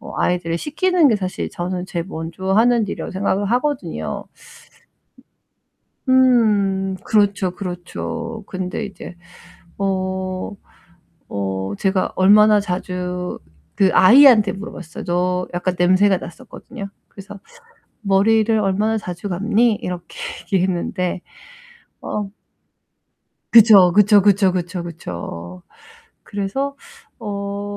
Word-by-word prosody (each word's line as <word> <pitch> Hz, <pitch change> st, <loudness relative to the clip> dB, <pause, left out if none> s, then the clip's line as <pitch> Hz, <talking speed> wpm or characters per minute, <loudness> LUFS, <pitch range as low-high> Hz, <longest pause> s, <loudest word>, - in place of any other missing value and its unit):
어 -, -, -10 dB
아이들을 170 Hz, -1 st, 0 dB
씻기는 340 Hz, +1 st, +2 dB
게 220 Hz, -, +2 dB
사실 185 Hz, -2 st, -4 dB
저는 180 Hz, +1 st, -4 dB
제일 170 Hz, -2 st, -4 dB
먼저 170 Hz, +2 st, -4 dB
하는 235 Hz, +2 st, +4 dB
일이라고 -, -, -5 dB
생각을 195 Hz, +1 st, -1 dB
하거든요. 285 Hz, +2 st, -2 dB, 1.8 s
음 210 Hz, -7 st, +3 dB
그렇죠, 200 Hz, -3 st, +1 dB
그렇죠. 205 Hz, +5 st, -6 dB
근데 185 Hz, +3 st, -4 dB
이제 190 Hz, -2 st, -10 dB, 0.6 s
어 190 Hz, -1 st, -2 dB, 0.8 s
어 95 Hz, -1 st, -3 dB
제가 190 Hz, -1 st, 0 dB
얼마나 210 Hz, +2 st, +5 dB
자주 180 Hz, -1 st, -4 dB, 0.4 s
그 190 Hz, -1 st, +3 dB
아이한테 230 Hz, -1 st, +7 dB
물어봤어요. 195 Hz, -5 st, -8 dB
저 180 Hz, +1 st, -1 dB
약간 180 Hz, +1 st, -1 dB
냄새가 185 Hz, +2 st, +3 dB
났었거든요. 220 Hz, 0 st, -10 dB, 0.2 s
그래서 200 Hz, 0 st, -11 dB, 0.6 s
"머리를 220 Hz, +2 st, +3 dB
얼마나 210 Hz, +2 st, 0 dB
자주 180 Hz, 0 st, -6 dB
감니?" 215 Hz, +5 st, +2 dB
이렇게 180 Hz, -1 st, -7 dB, 0.4 s
얘기했는데 180 Hz, -1 st, -1 dB, 0.8 s
어 205 Hz, -2 st, -4 dB, 1.2 s
그쵸, 210 Hz, -6 st, +8 dB
그쵸, 210 Hz, +1 st, +5 dB
그쵸, 200 Hz, -1 st, +3 dB
그쵸, 180 Hz, 0 st, -4 dB
그쵸. 90 Hz, -, -8 dB, 0.6 s
그래서 235 Hz, +8 st, -3 dB, 0.4 s
어 200 Hz, -2 st, -5 dB
195 Hz, 230 characters per minute, -20 LUFS, 180-215 Hz, 1.8 s, 그쵸